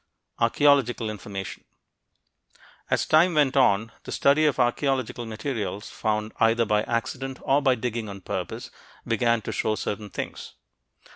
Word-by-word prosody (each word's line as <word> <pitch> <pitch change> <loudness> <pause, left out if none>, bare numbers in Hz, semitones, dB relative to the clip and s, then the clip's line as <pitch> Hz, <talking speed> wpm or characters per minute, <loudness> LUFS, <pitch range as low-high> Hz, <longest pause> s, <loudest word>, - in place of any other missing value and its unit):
ARCHEOLOGICAL 120 -2 +3
INFORMATION 100 -2 -7 1.3
As - - +1
time 165 +2 +4
went 145 -3 +3
on, 110 -4 +3
the - - -8
study 150 +3 +4
of 140 - 0
archeological 125 -1 0
materials 110 -2 -4
found 110 0 -1
either 115 +1 +3
by 105 0 +2
accident 130 +3 -3
or 140 +2 +3
by 135 -2 +3
digging 115 -2 -3
on 100 -1 -8
purpose - - -5 0.3
began 115 -1 +1
to - - -4
show 110 - 0
certain 105 0 -4
things. - - -6
115 Hz, 135 wpm, -25 LUFS, 110-135 Hz, 1.3 s, time